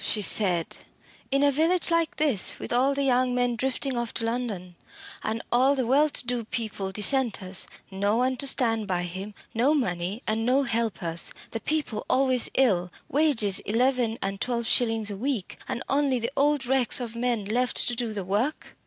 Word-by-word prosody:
she 215 Hz, -, +2 dB
said 185 Hz, -4 st, +3 dB, 0.5 s
"in 275 Hz, +1 st, +2 dB
a 285 Hz, -, +4 dB
village 330 Hz, +5 st, +2 dB
like 335 Hz, -1 st, +1 dB
this 275 Hz, -9 st, +1 dB
with -, -, -5 dB
all 265 Hz, +3 st, +2 dB
the 280 Hz, -, 0 dB
young 255 Hz, -1 st, +2 dB
men 245 Hz, -1 st, +1 dB
drifting 265 Hz, +2 st, -1 dB
off 240 Hz, -1 st, -2 dB
to 225 Hz, -, -3 dB
London, 225 Hz, -7 st, -3 dB, 0.5 s
and 220 Hz, +1 st, -3 dB
all 260 Hz, +4 st, +4 dB
the 260 Hz, -2 st, -1 dB
well 285 Hz, +5 st, +3 dB
to 275 Hz, -, -1 dB
do 245 Hz, -1 st, -1 dB
people 215 Hz, -3 st, -4 dB
dissenters 210 Hz, -3 st, 0 dB, 0.2 s
no 200 Hz, +2 st, 0 dB
one 255 Hz, +1 st, +1 dB
to 275 Hz, +2 st, -1 dB
stand 225 Hz, -5 st, +1 dB
by 180 Hz, -2 st, -1 dB
him 190 Hz, +4 st, -7 dB, 0.2 s
no 260 Hz, +7 st, +2 dB
money 190 Hz, -, -2 dB
and 220 Hz, +1 st, -1 dB
no 260 Hz, +4 st, +2 dB
helpers 220 Hz, -9 st, -2 dB, 0.2 s
the 225 Hz, -, -4 dB
people 290 Hz, -6 st, -2 dB
always 255 Hz, -2 st, +3 dB
ill 185 Hz, -9 st, +2 dB, 0.2 s
wages 255 Hz, -10 st, +3 dB
eleven 240 Hz, 0 st, 0 dB
and 195 Hz, 0 st, -4 dB
twelve 235 Hz, -2 st, -1 dB
shillings 225 Hz, -2 st, +2 dB
a -, -, -5 dB
week 240 Hz, -4 st, -3 dB
and 240 Hz, -, -4 dB
only 275 Hz, -2 st, +1 dB
the 235 Hz, +1 st, -3 dB
old 285 Hz, -1 st, +2 dB
wrecks 260 Hz, -1 st, +2 dB
of 235 Hz, -2 st, -6 dB
men 235 Hz, -3 st, -1 dB
left 245 Hz, +4 st, -1 dB
to 240 Hz, -, -1 dB
do 235 Hz, -1 st, -2 dB
the 200 Hz, -3 st, -4 dB
work! 215 Hz, +11 st, -2 dB
240 Hz, 185 wpm, -26 LUFS, 210-265 Hz, 0.5 s, a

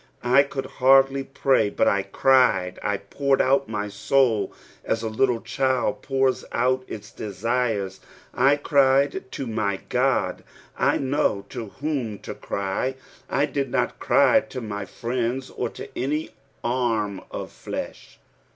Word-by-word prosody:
I 125 Hz, +3 st, +6 dB
could 140 Hz, -1 st, -4 dB
hardly 135 Hz, +1 st, +4 dB
pray, 135 Hz, -5 st, +2 dB
but -, -, +1 dB
I 100 Hz, -, +3 dB
cried; 100 Hz, -3 st, +3 dB
I 100 Hz, -1 st, 0 dB
poured 135 Hz, +8 st, 0 dB
out 135 Hz, 0 st, +2 dB
my 105 Hz, -2 st, -2 dB
aoul 110 Hz, +2 st, +1 dB, 0.4 s
aa -, -, +4 dB
a 115 Hz, -, -5 dB
little 115 Hz, +2 st, +1 dB
cliild 130 Hz, +2 st, 0 dB
poura 135 Hz, -1 st, +1 dB, 0.2 s
out 130 Hz, +2 st, +1 dB
its 105 Hz, +1 st, -8 dB
desires. 105 Hz, -2 st, -2 dB, 0.3 s
I 135 Hz, +3 st, +4 dB
cried 140 Hz, -2 st, +2 dB
to 135 Hz, -, -4 dB
my 110 Hz, -4 st, -1 dB
God: -, -, +1 dB, 0.3 s
I -, -, +2 dB
knew 130 Hz, -7 st, 0 dB
to 115 Hz, -, -6 dB
whom 135 Hz, -9 st, -2 dB
to -, -, -7 dB
cry; 100 Hz, +7 st, -2 dB, 0.3 s
I 140 Hz, -, +2 dB
did 140 Hz, -2 st, -2 dB
not -, -, -1 dB
cry -, -, +5 dB
to 130 Hz, -, -7 dB
my 105 Hz, -4 st, -5 dB
friends, 125 Hz, +4 st, -3 dB
or 120 Hz, -, -3 dB
to -, -, -9 dB
any 150 Hz, +5 st, -2 dB, 0.3 s
arm 115 Hz, -5 st, 0 dB
of -, -, -6 dB
flesh. -, -, -7 dB
125 Hz, 140 wpm, -24 LUFS, 105-135 Hz, 0.4 s, I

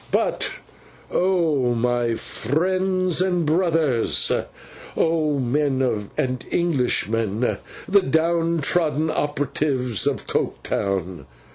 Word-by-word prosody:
'But -, -, 0 dB, 0.6 s
oh, 160 Hz, -9 st, +1 dB
my 120 Hz, 0 st, 0 dB
friends 185 Hz, -, 0 dB
and 180 Hz, -3 st, +1 dB
brothers! 160 Hz, -6 st, +2 dB, 0.7 s
Oh, 155 Hz, -3 st, +1 dB
men 130 Hz, -5 st, 0 dB
and 130 Hz, -1 st, -1 dB
Englishmen, 120 Hz, -, 0 dB, 0.3 s
the 200 Hz, +1 st, +5 dB
down 165 Hz, +1 st, +1 dB
trodden 155 Hz, 0 st, +1 dB
operatives 140 Hz, -, -1 dB
of -, -, -1 dB
Coketown! 95 Hz, -7 st, -2 dB
145 Hz, 85 wpm, -22 LUFS, 120-170 Hz, 0.7 s, the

